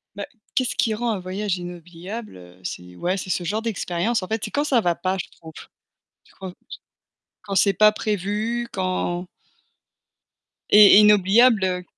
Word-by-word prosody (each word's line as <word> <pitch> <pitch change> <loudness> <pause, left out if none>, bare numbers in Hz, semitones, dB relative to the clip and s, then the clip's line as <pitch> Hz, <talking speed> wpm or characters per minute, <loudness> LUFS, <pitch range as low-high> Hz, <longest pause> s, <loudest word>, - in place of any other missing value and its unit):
Bah, - - -5 0.3
qu'est-ce 255 -2 0
qui 225 - +1
rend 235 +2 -2
un 210 - -3
voyage 190 +1 -3
inoubliable, 175 - -9
heu? 90 0 -16
C'est 90 0 -8
ouais, 180 - -2
c'est 185 - -7
ce 180 - -1
genre 210 +5 -2
d'expérience. 215 -1 -2
En - - -6
fait, 220 +1 -3
c'est - - -5
quand 290 - 0
ça 265 -6 +2
va 175 -4 0
pas, 185 +3 -2
je 185 - -5
trouve. 160 -1 -14 0.9
Quand 190 -1 -7
t - - -24 0.9
quand 200 -1 -5
c'est 200 +1 +3
pas 215 +3 +5
prévu, 215 +3 -3
quand 185 -1 -2 1.5
Et 205 -1 +8
inoubliable 210 +3 +5
heu 180 -1 -2
195 Hz, 165 wpm, -22 LUFS, 180-215 Hz, 1.5 s, Et